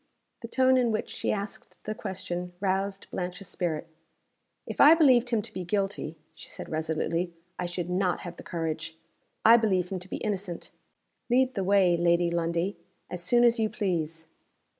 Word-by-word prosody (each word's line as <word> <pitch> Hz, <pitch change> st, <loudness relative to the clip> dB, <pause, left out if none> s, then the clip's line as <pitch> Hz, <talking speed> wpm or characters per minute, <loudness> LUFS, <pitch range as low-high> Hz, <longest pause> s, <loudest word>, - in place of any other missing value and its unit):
The 230 Hz, -, -6 dB
tone 260 Hz, +2 st, +4 dB
in 245 Hz, -2 st, +2 dB
which 215 Hz, -, -2 dB
she -, -, -1 dB
asked 200 Hz, 0 st, -5 dB
the 215 Hz, -, -3 dB
question 180 Hz, -3 st, -5 dB
roused 195 Hz, 0 st, -1 dB
Blanche's 180 Hz, +1 st, -4 dB
spirit. 170 Hz, -4 st, -2 dB, 0.8 s
"If -, -, -1 dB
I 305 Hz, +3 st, +9 dB
believed 260 Hz, -7 st, +5 dB
him 225 Hz, -3 st, +1 dB
to -, -, -7 dB
be 185 Hz, -, -4 dB
guilty," 195 Hz, -4 st, -2 dB, 0.2 s
she -, -, -9 dB
said, -, -, -8 dB
resolutely, 160 Hz, +2 st, -1 dB, 0.2 s
"I 180 Hz, -, -1 dB
should 175 Hz, -1 st, -3 dB
not 180 Hz, 0 st, 0 dB
have 175 Hz, -1 st, -8 dB
the -, -, -8 dB
courage. 160 Hz, -1 st, -4 dB, 0.5 s
I 230 Hz, +2 st, +9 dB
believe 190 Hz, -6 st, +1 dB
him 190 Hz, -, -2 dB
to 180 Hz, +1 st, -9 dB
be -, -, -3 dB
innocent. 195 Hz, -4 st, -4 dB, 0.6 s
Lead 255 Hz, +1 st, +3 dB
the 195 Hz, -, -1 dB
way, 185 Hz, -2 st, +4 dB
Lady 170 Hz, 0 st, +3 dB
Lundie, 170 Hz, +3 st, -1 dB, 0.3 s
as 180 Hz, -, -4 dB
soon 240 Hz, +7 st, +4 dB
as 235 Hz, 0 st, +4 dB
you 220 Hz, -1 st, +2 dB
please." 165 Hz, -7 st, -2 dB
185 Hz, 175 wpm, -28 LUFS, 170-215 Hz, 0.8 s, I